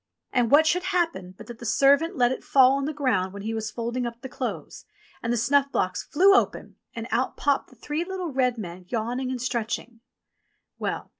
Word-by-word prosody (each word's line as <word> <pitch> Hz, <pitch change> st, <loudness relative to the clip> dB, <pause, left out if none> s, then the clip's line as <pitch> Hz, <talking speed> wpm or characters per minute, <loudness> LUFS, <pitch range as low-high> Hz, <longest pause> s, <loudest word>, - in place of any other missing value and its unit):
And 245 Hz, -3 st, +2 dB
what 295 Hz, +4 st, +6 dB
should 360 Hz, +3 st, +1 dB
happen 330 Hz, -, -1 dB
but -, -, -11 dB
that 240 Hz, -2 st, -10 dB
the -, -, -10 dB
servant 280 Hz, -, +3 dB
let 245 Hz, -1 st, +3 dB
it 260 Hz, -, -4 dB
fall 260 Hz, -2 st, +5 dB
on 275 Hz, 0 st, 0 dB
the 305 Hz, -, -1 dB
ground 250 Hz, -11 st, 0 dB
when 200 Hz, 0 st, -8 dB
he 220 Hz, +1 st, -3 dB
was 220 Hz, -1 st, -3 dB
folding 235 Hz, +2 st, -3 dB
up 235 Hz, 0 st, -8 dB
the 265 Hz, -, -7 dB
clothes, -, -, -5 dB, 0.4 s
and 230 Hz, -, -2 dB
the 240 Hz, -, +1 dB
snuff 275 Hz, +4 st, +2 dB
box 185 Hz, 0 st, -1 dB
flew 385 Hz, +6 st, +4 dB
open -, -, 0 dB, 0.2 s
and 230 Hz, 0 st, -5 dB
out 255 Hz, +2 st, 0 dB
popped 285 Hz, -1 st, 0 dB
the 255 Hz, -, -18 dB
three 295 Hz, +7 st, -3 dB
little 365 Hz, -2 st, -4 dB
red 250 Hz, -2 st, +1 dB
men 180 Hz, -3 st, -7 dB
yawn 235 Hz, +4 st, -2 dB
ing 260 Hz, -1 st, -3 dB
and 255 Hz, -1 st, -3 dB
stretching. 235 Hz, -1 st, -3 dB, 0.8 s
Well -, -, -3 dB
250 Hz, 215 wpm, -25 LUFS, 230-285 Hz, 0.8 s, what